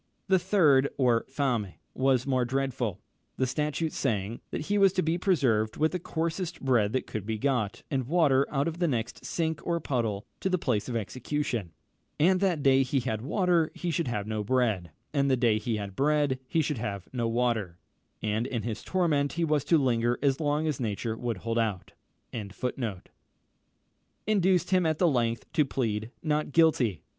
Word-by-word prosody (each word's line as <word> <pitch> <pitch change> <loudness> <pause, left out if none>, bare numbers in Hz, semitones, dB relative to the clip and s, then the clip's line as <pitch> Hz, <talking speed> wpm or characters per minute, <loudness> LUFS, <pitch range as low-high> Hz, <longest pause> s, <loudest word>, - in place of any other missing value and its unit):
The 190 -1 +5
third, 160 -8 +4
or 120 -4 +3
fame, 125 -8 -1 0.2
was 130 -2 +2
more 130 -2 +1
dreadful, 125 -5 -2 0.4
the 130 - +2
statute 150 +4 -1
saying, 110 -3 -2
"That - - -3
he 205 +7 0
was 195 -2 +5
to 185 - +1
be 165 +2 0
preserved 120 - +1
with 155 +1 +2
the 180 - -2
coarsest 170 +1 -3
bread 120 -6 +2
that 130 - 0
could 110 - -5
be 110 +1 -3
got, 120 -4 -1
and 130 -4 -1
water 140 -4 +3
out 140 +1 0
of 165 +1 -4
the 175 - +2
next 120 -5 -3
sink, 160 -2 -2
or 170 -1 0
puddle, 115 -8 -2
to 190 - -1
the 185 - +2
place 125 - -1
of 120 - -3
execution; 120 - -2 0.5
and 185 +4 +4
that 180 -7 +1
day 135 -1 +5
he 135 0 0
had 110 -3 -2
water 170 - +2
he 175 - -2
should 165 -2 -1
have 105 -4 -2
no 110 -1 -2
bread, 110 -7 +1 0.2
and 140 -1 +2
that 130 - +3
day 115 -3 +3
he 110 +1 -2
had 100 -2 -5
bread 145 -2 +2
he 160 +4 +1
should 145 -4 -2
have 100 -4 -4
no 120 -2 0
water;" 115 -7 0 0.5
and 110 +3 0
in 120 -4 -3
this 115 -2 -4
torment 155 -6 +1
he 170 - -1
was 150 -3 +1
to 165 - +4
linger 120 -3 +1
as 135 0 +2
long 150 0 0
as 155 -4 -1
nature 110 -1 -2
would 115 -2 -3
hold 115 0 0
out. 105 -5 -2
130 Hz, 165 wpm, -28 LUFS, 115-155 Hz, 0.5 s, The